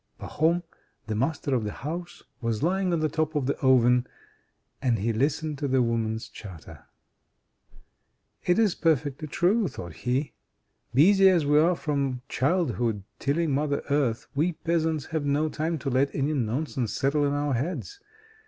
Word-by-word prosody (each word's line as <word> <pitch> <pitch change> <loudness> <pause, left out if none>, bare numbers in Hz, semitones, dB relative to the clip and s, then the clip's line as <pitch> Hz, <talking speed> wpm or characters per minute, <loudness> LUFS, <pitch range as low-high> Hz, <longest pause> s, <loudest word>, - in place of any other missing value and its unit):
Pahom, 170 +3 +1 0.4
the 110 - -3
master 140 +4 -1
of 120 -4 +1
the 105 - -3
house, 170 +8 -6 0.2
was 115 +1 -1
lying 185 +2 +1
on 170 -2 +1
the 155 - +2
top 155 +1 -1
of 145 -3 0
the 140 - 0
oven, 125 -2 +4 0.7
and 125 -4 +2
he 115 +3 0
listened 145 +4 -1
to 145 - -1
the 130 -1 +3
women's 115 -1 -1
chatter. 95 -7 -11 1.6
"It 180 - +2
is 215 -5 +3
perfectly 155 -1 0
true," 190 +8 +2
thought 85 - -8
he. 130 - -2 0.6
"Busy 190 +9 +6
as 175 -5 +3
we 150 +1 +4
are 170 +3 +4
from 140 -5 -2
childhood 125 - 0 0.2
tilling 155 +3 0
Mother 140 +1 0
Earth, 135 -6 +1
we 160 +5 +1
peasants 160 -2 -1
have 160 -2 -2
no 145 +2 +1
time 160 +2 -2
to 135 -1 -3
let 135 +2 +1
any 145 +2 0
nonsense 130 -1 -2
settle 145 +2 +1
in 140 0 +1
our 145 -1 0
heads. 180 - -3
145 Hz, 160 wpm, -26 LUFS, 125-160 Hz, 1.6 s, Busy